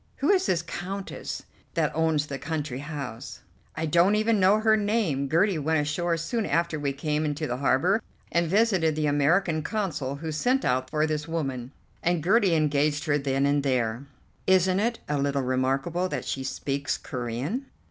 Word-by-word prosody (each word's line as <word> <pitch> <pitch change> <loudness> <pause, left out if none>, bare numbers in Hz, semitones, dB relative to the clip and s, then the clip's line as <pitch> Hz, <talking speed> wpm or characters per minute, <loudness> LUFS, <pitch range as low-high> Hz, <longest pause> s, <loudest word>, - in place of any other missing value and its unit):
"Who 290 +7 +2
is 380 -1 +3
this 175 -1 +1
Countess 190 +3 -5 0.3
that 160 -3 +1
owns 160 -2 +2
the 140 -2 -6
country 150 -3 -3
house?" 140 -5 -6 0.3
"I 160 - -2
don't 175 +6 +4
even 215 0 +2
know 190 +3 +5
her 220 0 +4
name. 205 -11 0
Gertie 170 +3 +2
went 160 +2 +1
ashore 165 +3 0
soon 170 +8 -2
after 165 +1 0
we 140 -1 -1
came 150 +2 -1
into 150 +1 -2
the 125 -4 -2
harbour 140 - +2 0.3
and 170 0 +2
visited 190 -5 +2
the 155 0 0
American 155 +4 +2
Consul, 155 -8 -2
who 160 +2 -5
sent 250 - +1
out 130 0 +1
for 155 0 +1
this 155 0 -2
woman, 135 -6 -3 0.3
and 175 -2 +1
Gertie 195 -1 +4
engaged 150 0 +1
her 145 -2 +2
then 135 0 0
and 145 0 +2
there." 125 -1 -1 0.4
"Isn't 185 0 +4
it 230 +2 0
a 150 -1 0
little 140 -1 0
remarkable 135 +8 0
that - - -3
she 135 - -3
speaks 140 +1 -2
Corean?" 130 - -4
155 Hz, 175 wpm, -26 LUFS, 140-185 Hz, 0.4 s, know